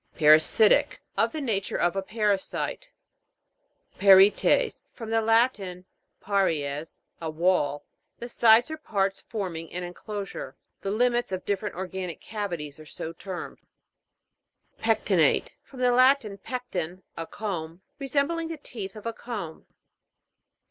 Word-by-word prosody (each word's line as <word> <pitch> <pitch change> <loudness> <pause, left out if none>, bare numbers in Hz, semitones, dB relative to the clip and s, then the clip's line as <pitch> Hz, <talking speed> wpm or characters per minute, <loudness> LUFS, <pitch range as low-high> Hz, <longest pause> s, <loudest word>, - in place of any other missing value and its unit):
PARASI'TIC. 155 +8 +5 0.2
Of - - +2
the 315 - -4
nature 210 -7 -1
of 175 +2 +1
a 195 - 0
parasite. 210 - -1 1.1
PARI'ETES. 200 - +5
From 225 -2 -8
the 225 0 +3
Latin, 220 -5 +1 0.3
pari'es, 160 -7 -1 0.2
a 160 - -3
wall. 155 -3 +1 0.3
The 240 - -6
sides 235 +3 +5
or 315 - -4
parts 195 -9 -1
form 190 -7 -4
ing 165 0 -8
an 180 +1 -4
enclosure; 195 -5 -6 0.2
the 195 - -3
limits 240 +1 +1
of 185 -1 -4
different 205 +1 -2
organic 185 -1 -5
cavities 175 -9 -5
are 155 - -11
so 160 +2 -6
termed. 185 +1 -7 1.2
PEC'TINATE. 210 -8 +2
From 260 -2 -11
the 250 0 +4
Latin, 255 -5 +4
pecten, 185 -7 -5
a 165 0 -5
comb. 175 -4 -5 0.2
Resembling 285 +5 0
the 330 -1 -5
teeth 210 -9 -8
of 215 - -10
a 230 - -2
comb. 205 -12 -7
200 Hz, 130 wpm, -26 LUFS, 175-230 Hz, 1.2 s, PARASI'TIC